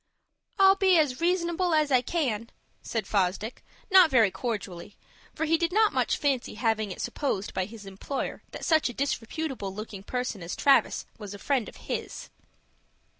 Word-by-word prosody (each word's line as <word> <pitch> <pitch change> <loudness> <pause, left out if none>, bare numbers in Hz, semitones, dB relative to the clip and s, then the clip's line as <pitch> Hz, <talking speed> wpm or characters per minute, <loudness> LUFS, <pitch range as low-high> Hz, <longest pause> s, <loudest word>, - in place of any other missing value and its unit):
"I'll 390 0 +6
be 380 -3 +4
as 290 -3 +1
reasonable 345 0 +1
as 305 -2 +2
I 255 -2 +5
can," 235 -7 -2 0.3
said 225 -4 -3
Fosdick, 200 +4 -1 0.3
not 370 -3 +8
very 230 -7 +4
cordially; 205 -5 -5 0.4
for 320 - -1
he 325 +1 +2
did 335 0 0
not 430 +2 +3
much - - +1
fancy 275 -6 -1
having 220 -2 0
it - - -8
supposed 205 -9 -2
by 185 - -1
his 215 0 -11
employer 195 +8 -5
that - - -7
such 315 -5 +3
a - - -6
disreputable 270 -4 -3
looking 210 0 -7
person 250 -1 -3
as 170 +1 -5
Travis 275 -1 +3
was 205 -2 -7
a - - -8
friend 260 +1 -1
of - - -16
his. - - -5
250 Hz, 170 wpm, -27 LUFS, 210-320 Hz, 0.4 s, not